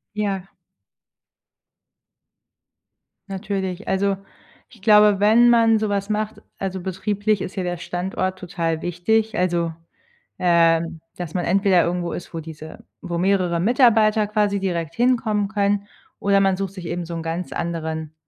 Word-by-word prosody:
Ja. 195 -3 -2 2.8
Natürlich. 195 -1 -4
Also, 195 +1 +1 0.5
ich 230 -6 -20
glaube, 210 -1 +6
wenn 225 +4 +6
man 225 -2 +5
so 215 0 -1
was 200 0 -2
macht, 215 0 -2 0.2
also, 190 -1 -3
betrieblich 205 +3 -1
ist 185 - -5
hier 190 - -2
der 175 0 -2
Standort 185 +2 -3
total 165 -3 -3
wichtig, 220 +6 0
also, 170 -2 0 0.7
ähm, 165 -1 +2 0.2
dass 175 -3 -6
man 180 - -1
entweder 190 -1 +3
irgendwo 175 0 -2
ist, 175 - -8
wo 165 - -3
diese 160 0 -10 0.2
wo 170 - -4
mehrere 180 -2 +1
Mitarbeiter 220 0 +4
quasi 205 -1 +1
direkt 170 -4 -3
hinkommen 230 -4 +1
können 205 -1 0 0.3
oder 200 0 +3
man 195 -1 +2
sucht 195 -1 -4
sich 185 -3 -9
eben 175 0 -3
so 170 - -7
'n 165 - -4
ganz 165 +2 -4
anderen, 160 -2 -4
190 Hz, 140 wpm, -22 LUFS, 175-210 Hz, 2.8 s, glaube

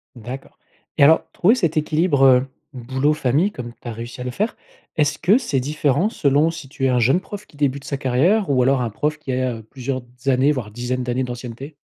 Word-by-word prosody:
D'accord. 125 +3 -9 0.4
Et - - +5
alors 160 +3 +6
trouver 210 +7 +4
cet 170 - 0
équilibre, 155 -2 +2
heu, 130 0 +5 0.3
boulot- 130 +4 0
famille 150 +7 +1
comme 120 - -7
tu - - -11
as - - -3
réussi 115 +3 -8
à - - -3
le 125 - -4
faire, 210 - -2 0.4
est-ce 150 -1 +1
que 205 +7 +4
c'est 150 - -1
différent 150 - +1
selon 145 -2 +2
si 165 -4 -7
tu 135 -1 -3
es - - +3
un 125 -1 +2
jeune 130 +9 +3
prof 205 +1 -9
qui - - -22
débute 140 -1 0
sa 140 - -3
carrière 145 - +2
ou 130 -2 +3
alors 135 0 +2
un 120 - -1
prof 150 +8 -2
qui 140 - -5
a 125 -3 -1
plusieurs 130 0 -4 0.2
années, 135 +2 +3
voire 120 -7 -4
dizaines 125 +2 -3
d'années 125 +1 -1
d'ancienneté? 125 +4 -7
135 Hz, 215 wpm, -21 LUFS, 125-150 Hz, 0.4 s, alors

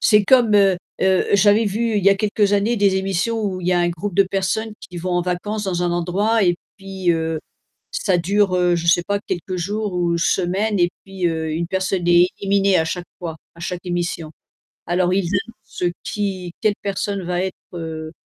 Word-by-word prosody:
c'est 210 -2 +5
comme, 240 -2 +5
heu 195 -3 +4 0.2
heu, 190 -1 +3
j'avais 205 +2 +4
vu 220 +2 0
il 195 - -3
y - - +8
a 200 - +5
quelques 205 0 +1
années 210 +4 +1
des 200 -2 +3
émissions 195 +4 -1
où 185 -2 -2
il 175 - -5
y - - +3
a 175 - +3
un 175 - +2
groupe 170 +3 -5
de 195 - +6
personnes 195 +3 -2
qui 200 -3 -10
vont 180 +2 -3
en 175 0 +2
vacances 190 +4 -2
dans 180 -2 -1
un 175 - +1
endroit 200 +6 +1
et 175 -2 +3 0.2
puis 190 -2 -2
heu, 160 -1 -1 0.5
ça - - +1
dure, 195 +2 +2
heu, 180 -1 +3
je 170 0 -3
sais 175 +1 +4
pas, 200 0 0
quelques 185 -2 -4
jours 205 +3 -2
ou 175 -1 +1
semaines 190 +5 +1
et 175 0 +4
puis 195 -2 -4
heu, 160 -1 -2
une 165 +2 -2
personne 190 -1 -1
est 175 +1 +6
éliminée 195 -1 +3
à 160 - +2
chaque 175 +2 -4
fois, 165 -3 -5 0.2
à - - -16
chaque 180 +1 -5
émission. 170 -3 -3 0.5
Alors 175 +1 +1
ils 190 -3 0
annoncent, 210 -1 -4
heu, 175 - +2
qui, 190 -4 -3
quelle 210 -1 +2
personne 200 0 -2
va 175 0 -1
être, 190 -1 -3 0.2
heu 160 -2 -5
190 Hz, 210 wpm, -21 LUFS, 175-205 Hz, 0.5 s, y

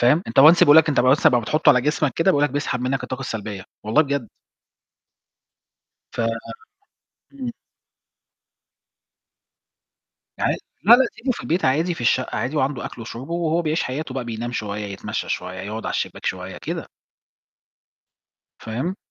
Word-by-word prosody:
فاهم، 135 +8 +4
أنت - - +3
once 160 +4 +8
بيقول 145 +1 +7
لك 160 0 +6
أنت 145 - +3
بس 130 +4 +4
أما 125 - +5
بتحطه 150 +7 +1
على 125 - +6
جسمك 150 0 0
كده 165 +3 +3
بيقول 145 -4 +3
لك 145 - 0
بيسحب 135 -2 -2
منك 130 +1 -1
الطاقة 130 +1 -5
السلبية، 105 -6 -5 0.2
والله 110 +9 +3
بجد. 140 -5 -3 1.8
ف - - -4 1.1
إمم. 260 -3 -5 2.9
عا - - +1 0.3
لا، 235 - +8
لا، 260 +2 +4
سيبه 255 0 -1
في - - -8
البيت 175 +3 -1
عادي 160 +7 +2
في - - -10
الشقة 120 +2 +1
عادي 125 +7 -2
وعنده 135 -2 -1
أكْلُه 115 - -7
وشُربه 125 +7 -7
وهو 170 0 0
بيعيش 155 +1 0
حياته 130 +1 -4
بقى 135 -2 -3
بينام 120 +1 -5
شوية، 105 -3 -4
يتمشى 100 -1 -5
شوية، 90 0 -4
يقعد 105 +3 -6
على - - -2
الشباك - - -4
شوية، - - -4
كده. - - -5 1.7
فاهم؟ 130 +12 -4
135 Hz, 155 wpm, -22 LUFS, 120-160 Hz, 2.9 s, once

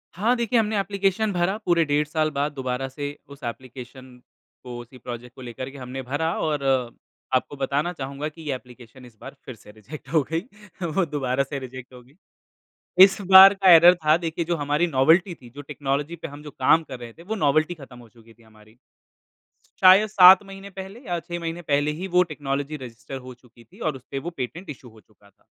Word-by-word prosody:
हाँ 225 +7 +1
देखिए, 235 0 +1
हमने 215 -1 0
एप्लीकेशन 200 +2 0
भरा 180 +3 0
पूरे 170 -2 +3
डेढ़ 150 0 0
साल 155 0 0
बाद 145 +1 -2
दोबारा 130 -1 -3
से 145 +1 -6
उस 140 0 -14
एप्लीकेशन 125 +1 -9 0.5
को 125 -1 -8
उसी 120 +2 -12
प्रोजेक्ट 120 0 -9
को - - -12
लेकर 125 +1 -7
के 140 - -12
हमने 130 0 -7
भरा 145 +6 -2
और 150 -3 -1 0.7
आपको 130 +3 -1
बताना 140 +5 -1
चाहूँगा 140 0 -5
कि 165 +2 -15
ये 150 -4 -3
एप्लीकेशन 125 0 -14
इस 115 -3 -18
बार - - -10
फिर 130 - -8
से 105 - -16
रिजेक्ट 120 +7 -12
हो 160 - +4
गई, 165 - +1 0.4
वो 170 +2 0
दोबारा 140 -3 -1
से 135 0 -6
रिजेक्ट 130 0 -10
हो 125 - -12
गई। 130 +3 -24 0.9
इस 195 +1 +1
बार 190 +1 +10
का 195 -1 +2
एर्रर 170 +2 +8
था 155 +1 +5
देखिए 165 0 -3
जो 170 +1 -1
हमारी 150 +3 0
नॉवेल्टी 165 +5 +3
थी, 125 -5 -16
जो 145 +4 -10
टेक्नोलॉजी 145 +3 -3
पे 165 - -8
हम 145 +1 -12
जो 150 - -9
काम 160 +3 +3
कर 130 -4 -9
रहे 120 -1 -10
थे, 165 - -16
वो 215 +6 -4
नॉवेल्टी 155 -1 +1
ख़त्म 135 -6 -14
हो 120 - -15
चुकी 115 0 -20
थी 115 - -25
हमारी। 110 +1 -21 1.0
शायद 190 +3 +7
7 185 -1 +8
महीने 195 0 -11
पहले 190 +4 -8
या 175 -1 -2
6 175 +1 -7
महीने 165 +1 -5
पहले 145 -2 0
ही 190 - -4
वो 180 - +7
टेक्नोलॉजी 145 0 -4
रजिस्टर 120 +2 -9
हो 130 - -9
चुकी 120 -1 -20
थी 115 - -21
और 150 - -5
उसपे 135 +2 -7
वो - - 0
पेटेंट 160 +8 -6
इश्यू 130 -3 -10
हो 110 - -18
चुका 105 -1 -26
था। - - -35
145 Hz, 210 wpm, -23 LUFS, 130-170 Hz, 1.0 s, बार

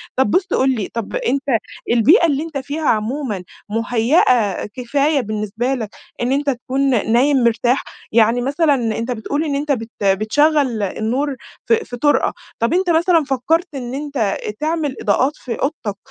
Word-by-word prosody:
طب 260 -5 +2
بُص 370 - +2
قُل 265 - +3
لي 210 -5 -3
طب 230 -3 -4
أنت 275 +3 0 0.5
البيئة 285 - +5
اللي 295 -1 +1
أنت 320 -3 -5
فيها 285 +3 -3
عمومًا 220 -2 -1 0.3
مُهيئة 230 - +2
كفاية 275 +6 0
بالنسبة 215 +3 -2
لَك 225 -5 -3 0.3
إن 245 +2 0
أنت 285 +1 +1
تكون 255 -3 0
نايم 260 +2 +3
مرتاح، 240 +3 +2 0.3
يعني 230 +2 +3
مثلًا 285 +3 +2 0.2
أنت 230 +2 -3
بتقول 280 +7 -2
إن 285 -2 -1
أنت 290 +1 -1
بت 225 -4 -2
بتشغّل 230 +5 +2
النور 250 +8 -1 0.3
في 460 - +4
في 245 - -7
طُرقة، 290 +4 +2 0.3
طب 230 +8 +1
أنت 365 0 +1
مثلًا 335 -1 +3
فكّرت 295 +7 0
إن 250 -2 -5
أنت 275 -8 -1 0.2
تعمل 310 -3 -1
إضاءات 255 +7 +2
في 235 -3 -5
أوضتك 255 -8 -3
260 Hz, 155 wpm, -19 LUFS, 225-290 Hz, 0.5 s, البيئة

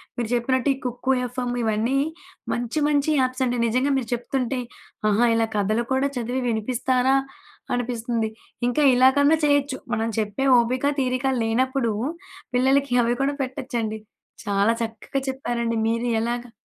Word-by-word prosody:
మీరు 235 -2 -3
జెప్పినట్టు 260 +2 +1
ఈ - - -13
కుక్కు 250 +2 0
ఎఫ్‌ఎ‌మ్ 245 0 -3
ఇవన్నీ 225 +4 +1 0.6
మంచి 245 +5 -2
మంచి 295 0 +2
యాప్సండి 255 -1 0
నిజంగా 255 +5 +1
మీరు 240 -4 -3
చెప్తుంటే 250 +1 -2 0.5
ఆహా! 220 +4 +3
ఇలా 225 0 +2
కథలు 215 +4 +1
కూడా 270 +2 +1
చదివి 245 +2 -2
వినిపిస్తారా? 250 +3 +1 0.6
అనిపిస్తుంది. 235 -2 -1 0.4
ఇంకా 245 +5 +1
ఇలాగన్నా 275 +4 +5
చేయొచ్చు. 285 -2 +2 0.2
మనం 225 +1 0
చెప్పే 215 +5 -1
ఓపిక, 250 +3 0 0.2
తీరిక 255 +1 -1 0.2
లేనప్పుడు 245 +1 +1 0.6
పిల్లలకి 265 +1 +3
అవి 235 +1 +1
కూడా 280 +1 0
పెట్టొచ్చండి. 245 -4 -4 0.5
చాలా 200 +2 +2
చక్కగా 225 +4 -4
చెప్పారండి. 240 -3 -2
మీరు 230 +2 0
ఎలాగా 240 +1 -3
245 Hz, 130 wpm, -24 LUFS, 230-265 Hz, 0.6 s, ఇలాగన్నా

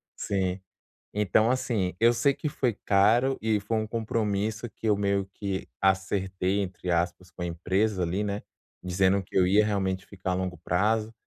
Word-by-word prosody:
Sim. 95 -1 -1 0.5
Então 105 +2 +3
assim, 110 -8 0
eu 115 +1 +6
sei 120 +4 +3
que 150 - -3
foi 125 -4 0
caro 115 +7 +4
e 110 -1 +1
foi 110 +3 -1
um 110 0 -1
compromisso 110 0 -1
que 110 - -6
eu 105 -2 +3
meio 100 -1 +1
que 100 -2 -3 0.2
acertei 95 0 +1
entre 90 -2 -3
aspas 85 +1 -1
com 90 - -11
a - - -1
empresa 95 +3 0
ali, 95 +5 -1
né, 100 0 -3 0.4
dizendo 95 +2 +2
que - - -15
eu 90 -1 +5
ia 105 +3 +4
realmente 95 -2 -1
ficar 95 -2 -4
a - - +1
longo 90 -1 -2
prazo, 105 +7 0
100 Hz, 175 wpm, -27 LUFS, 95-110 Hz, 0.5 s, eu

